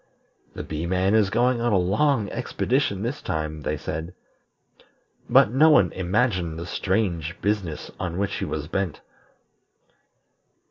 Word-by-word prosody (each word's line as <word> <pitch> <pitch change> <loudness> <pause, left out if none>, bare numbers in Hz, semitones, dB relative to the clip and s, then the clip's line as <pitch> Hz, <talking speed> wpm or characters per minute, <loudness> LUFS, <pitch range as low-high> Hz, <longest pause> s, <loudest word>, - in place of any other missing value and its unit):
"The - - -5
Bee 80 +2 -4
man 95 +2 +1
is 110 -3 +4
going 120 +3 +2
on 120 0 +1
a 100 - +4
long 105 +6 +2
expedition 125 -3 -1
this 125 +5 -3
time," 75 -1 -3
they 75 +1 -2
said; 80 +4 -5 1.1
but 100 - +6
no 150 +6 +5
one 100 - +5
imagined 95 -3 0
the 85 - -5
strange 90 -2 -1
business 100 -7 -2
on 85 -1 -3
which 100 0 -1
he - - -2
was 75 -1 -4
bent. 90 -1 -3
95 Hz, 140 wpm, -24 LUFS, 85-110 Hz, 1.1 s, but